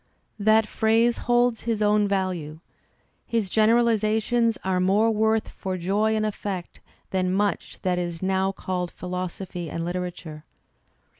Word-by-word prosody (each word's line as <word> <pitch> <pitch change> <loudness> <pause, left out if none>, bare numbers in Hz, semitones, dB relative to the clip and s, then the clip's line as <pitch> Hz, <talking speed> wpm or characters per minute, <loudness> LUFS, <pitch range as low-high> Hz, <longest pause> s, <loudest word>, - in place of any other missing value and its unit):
That 220 +1 +4
phrase 225 +2 +2
holds 240 -1 +3
his 225 -2 0
own 210 0 +3
value. 180 -6 -2 0.7
His 220 -5 -1
generalizations 225 0 +2
are 185 -1 0
more 200 +5 +3
worth 220 0 +1
for 185 -1 -4
joy 205 +5 +1
and 215 0 0
effect 200 -4 -5 0.3
than 185 -1 0
much 200 +1 -1
that 180 -2 +1
is 175 0 -4
now 190 0 +1
called 180 -2 -3
philosophy 180 -1 -5
and 165 +3 -4
Uterature. 175 -3 -5
195 Hz, 130 wpm, -25 LUFS, 180-220 Hz, 0.7 s, That